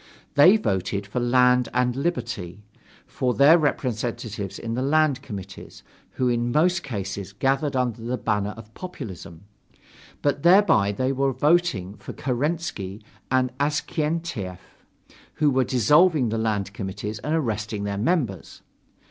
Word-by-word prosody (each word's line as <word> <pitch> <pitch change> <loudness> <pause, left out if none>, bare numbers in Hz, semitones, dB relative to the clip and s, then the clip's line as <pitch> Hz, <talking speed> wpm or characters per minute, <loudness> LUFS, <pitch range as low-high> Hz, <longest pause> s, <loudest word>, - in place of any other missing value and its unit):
They 180 +9 +7
voted 100 - -2
for 105 +5 -3
"Land 125 0 +3
and 125 -1 +1
Liberty," 115 - -3 0.4
for 125 -1 -2
their 150 +5 +6
representatives 115 - -2
in 115 0 -5
the 125 - -1
land 145 0 +2
committees, 95 -4 -9 0.3
who 130 - 0
in 120 0 0
most 175 +6 +2
cases 100 - -5
gathered 135 +6 0
under 125 -3 -1
the 120 +2 -2
banner 105 -2 -1
of 110 0 -13
populism: 100 - -9 0.8
but 145 0 +1
thereby 170 - +5
they 130 +6 -1
were 135 0 +1
voting 145 - +1
for 100 - -9
Kerensky 125 - -3 0.3
and 130 -1 +1
Avksentiev, 150 - -2 0.8
who 150 -1 +2
were 130 0 +2
dissolving 145 - +3
the 115 +1 -1
land 105 -3 -1
committees, 105 +1 -5
and 150 +8 -1
arresting 110 -7 -2
their 100 -1 -3
members. 120 - -2
125 Hz, 130 wpm, -24 LUFS, 105-145 Hz, 0.8 s, They